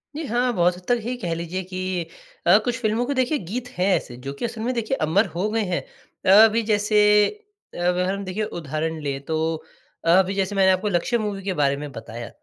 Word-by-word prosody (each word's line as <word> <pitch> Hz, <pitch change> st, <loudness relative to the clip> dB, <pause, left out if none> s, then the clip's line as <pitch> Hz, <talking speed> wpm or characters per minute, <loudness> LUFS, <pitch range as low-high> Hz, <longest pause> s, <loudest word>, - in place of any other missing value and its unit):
जी 315 Hz, -, -4 dB
हाँ, 245 Hz, 0 st, +1 dB
बहुत 175 Hz, -2 st, +2 dB
हद 180 Hz, -, -14 dB
तक 245 Hz, -1 st, +2 dB
ही 240 Hz, +3 st, -3 dB
कह 175 Hz, -7 st, -3 dB
लीजिए 170 Hz, +3 st, -4 dB
कि 185 Hz, -2 st, -3 dB, 0.4 s
अ, 180 Hz, +4 st, +8 dB
कुछ 245 Hz, -1 st, -1 dB
फ़िल्मों 220 Hz, +2 st, +1 dB
को 285 Hz, -, -1 dB
देखिए 260 Hz, +3 st, +1 dB
गीत 235 Hz, -, -5 dB
है 180 Hz, -, +1 dB
ऐसे 120 Hz, -, -4 dB
जो 135 Hz, -, -3 dB
कि 140 Hz, -, -4 dB
असल 230 Hz, -1 st, -5 dB
में 245 Hz, +3 st, -1 dB
देखिए 235 Hz, +2 st, -1 dB
अमर 155 Hz, +1 st, +3 dB
हो 185 Hz, +5 st, -1 dB
गए 225 Hz, +1 st, 0 dB
हैं। 180 Hz, -3 st, -1 dB, 0.6 s
अभी 225 Hz, +1 st, +2 dB
जैसे, 210 Hz, 0 st, +4 dB, 0.5 s
अगर 180 Hz, +1 st, +1 dB
हम 200 Hz, 0 st, -4 dB
देखिए 185 Hz, +4 st, -3 dB, 0.2 s
उदाहरण 160 Hz, +1 st, -3 dB
लें 140 Hz, -2 st, -3 dB
तो 160 Hz, -, -1 dB, 0.7 s
अभी 185 Hz, +3 st, +4 dB
जैसे 195 Hz, +1 st, -1 dB
मैंने 190 Hz, -1 st, +5 dB
आपको 185 Hz, +2 st, 0 dB
लक्ष्य 195 Hz, +6 st, +1 dB
मूवी 205 Hz, -3 st, -3 dB
के 195 Hz, 0 st, -1 dB
बारे 140 Hz, -4 st, +1 dB
में 145 Hz, 0 st, -6 dB
बताया, 115 Hz, -1 st, -8 dB
190 Hz, 215 wpm, -23 LUFS, 170-220 Hz, 0.7 s, अ